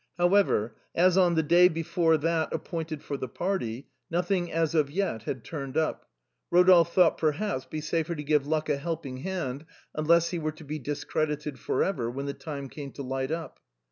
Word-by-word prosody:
However, 175 - +2 0.2
as 180 +1 +4
on 180 -3 +4
the 160 - +3
day 175 +4 +6
before 165 -1 +1
that 160 +1 0
appointed 160 -3 -4
for 140 - -4
the 130 - -4
party, 135 - -3 0.2
nothing 175 +1 0
had 165 - -5 0.2
as 150 -4 +2
yet 135 - -2
turned 140 -3 -5
up, 160 -1 -1 0.4
Rodolphe 175 -1 +6
thought 180 -2 +7
it - - -15
would 155 -1 +4
perhaps 195 -7 -3
be 155 - -5
safer 165 +2 -1
to 150 - -5
give 150 -1 +2
luck 155 0 0
a 145 -2 +1
helping 150 -4 -4
hand, 145 -3 -4 0.3
unless 170 +2 +3
he 175 - -2
were 155 -1 -2
to 155 - -13
be 150 +1 -5
discredited 150 0 -2
for 130 - 0
ever, 130 -12 -1
when 135 +3 -4
the 140 - -3
time 140 -3 -6
came 140 0 -8
to 140 - -6
light 130 0 -2
up. 160 0 -5
155 Hz, 195 wpm, -28 LUFS, 140-170 Hz, 0.4 s, thought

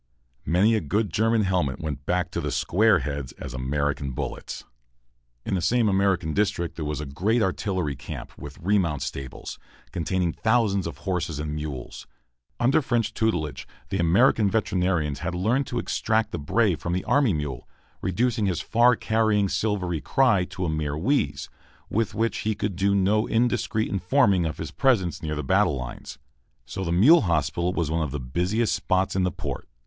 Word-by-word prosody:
Many 95 +9 +4
a 110 - +1
good 100 +4 -1
German 115 +2 +2
helmet 90 -8 0
went 75 -2 -5
back 90 0 0
to - - -2
the - - -2
"square 105 0 +3
heads" 70 -3 -4
as 65 -3 -8
American 70 +1 -2
bullets. - - -5 0.8
In - - -2
the 95 - 0
same 115 +6 +2
American 95 -5 +1
district 90 -4 0
there 80 - -4
was 75 0 -3
a 75 - -4
great 100 - 0
artillery 95 -6 -1
camp, - - -8
with 70 0 -10
remount 85 -7 0
stables, 65 -2 -6 0.3
containing 85 0 -1
thousands 110 -5 +1
of 85 - -7
horses 85 -5 -1
and 75 0 -4
mules. 75 -4 -6 0.5
Under 130 +6 +3
French 115 -5 0
tutelage, 90 -11 -1 0.2
the 95 - -2
American 100 +5 +4
veterinarians 90 -8 0
had 90 +2 -3
learned 115 +10 +1
to 120 - -4
extract 110 -1 0
the 85 - -4
bray 100 +7 +2
from 85 +2 -4
the 90 - -1
army 140 -6 +3
mule, 75 -6 -4 0.3
reducing 110 +2 0
his 90 -4 -1
far 120 +2 +4
carrying 110 -2 +1
silvery 90 -8 -1
cry 105 - +3
to 90 0 -5
a - - 0
mere 75 -2 -2
wheeze, 85 - 0 0.4
with 110 -1 0
which 115 +2 0
he 110 0 -1
could 100 -2 -3
do 100 +2 +2
no 100 +3 +2
indiscreet 115 -1 +1
informing 95 - +2
of 75 - -5
his - - -5
presence 100 - +1
near 75 -1 -3
the 75 - -3
battle 70 - +2
lines. 65 -1 -7 0.5
So 95 +7 -5
the 85 - -2
mule 125 - +6
hospital 85 0 0
was 85 -4 -1
one 80 +1 0
of 75 - -1
the 70 +2 -4
busiest 90 - 0
spots 95 0 0
in 95 - +2
the 90 0 +1
port. - - -6
90 Hz, 175 wpm, -25 LUFS, 75-110 Hz, 0.8 s, mule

